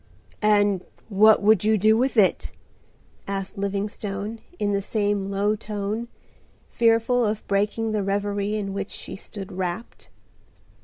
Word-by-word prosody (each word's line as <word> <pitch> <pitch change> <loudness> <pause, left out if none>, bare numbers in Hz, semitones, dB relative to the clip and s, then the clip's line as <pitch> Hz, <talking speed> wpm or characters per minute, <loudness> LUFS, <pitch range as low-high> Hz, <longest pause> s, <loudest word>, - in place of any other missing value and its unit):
"And 205 -3 +3 0.3
what 215 +1 +5
would 210 -2 +5
you 215 +1 +3
do 215 +2 +4
with 255 +2 0
it?" 200 -3 +3 0.7
asked 195 -1 -4
Livingstone 200 +2 -3 0.2
in 205 -1 0
the 200 - +1
same 205 -1 -1
low 200 +2 +1
tone, 210 +2 -4 0.6
fearful 230 +1 +3
of 210 -1 -1
breaking 210 +3 0
the 215 -1 0
reverie 200 +1 -1
in 200 -2 -3
which 195 0 -4
she - - -6
stood 195 0 -9
wrapped. 185 +4 -5
205 Hz, 135 wpm, -24 LUFS, 200-215 Hz, 0.7 s, what